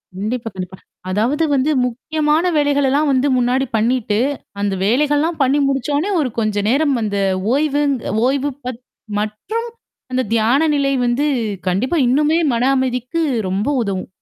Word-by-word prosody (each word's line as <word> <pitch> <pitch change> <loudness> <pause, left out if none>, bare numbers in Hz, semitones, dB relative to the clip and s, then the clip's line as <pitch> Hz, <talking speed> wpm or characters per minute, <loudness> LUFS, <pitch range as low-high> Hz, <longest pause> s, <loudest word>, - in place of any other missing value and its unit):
கண்டிப்பா, 225 +4 -3
கண்டிப்பா. 185 0 -6 0.3
அதாவது 240 - +1
வந்து 275 +3 +2
முக்கியமான 300 +6 0
வேலைகளெல்லாம் 285 0 +2
வந்து 265 +1 +2
முன்னாடி 250 +2 +1
பண்ணிட்டு, 220 -1 +1 0.4
அந்த 200 -1 0
வேலைகள்லாம் 295 +7 +1
பண்ணி 275 +2 +3
முடிச்சோ 275 +1 -1
உடனே 365 +8 -1
ஒரு 260 - -1
கொஞ்ச 215 -2 0
நேரம் 280 +2 +2
அந்த 205 -2 -2 0.4
ஓய்வுங் 290 -1 +1 0.3
ஓய்வு 275 +1 0
பத் 250 -1 -5 0.4
மற்றும் 370 - -3 0.4
அந்த 255 0 +1
தியான 240 +8 +3
நிலை 280 -1 +1
வந்து 245 +4 +1 0.4
கண்டிப்பா 235 - 0
இன்னுமே 300 +5 +2 0.2
மன 235 +1 0
அமைதிக்கு 260 +4 -1 0.3
ரொம்ப 195 +6 -1
உதவும். 195 -3 -3
260 Hz, 135 wpm, -18 LUFS, 225-290 Hz, 0.4 s, பண்ணி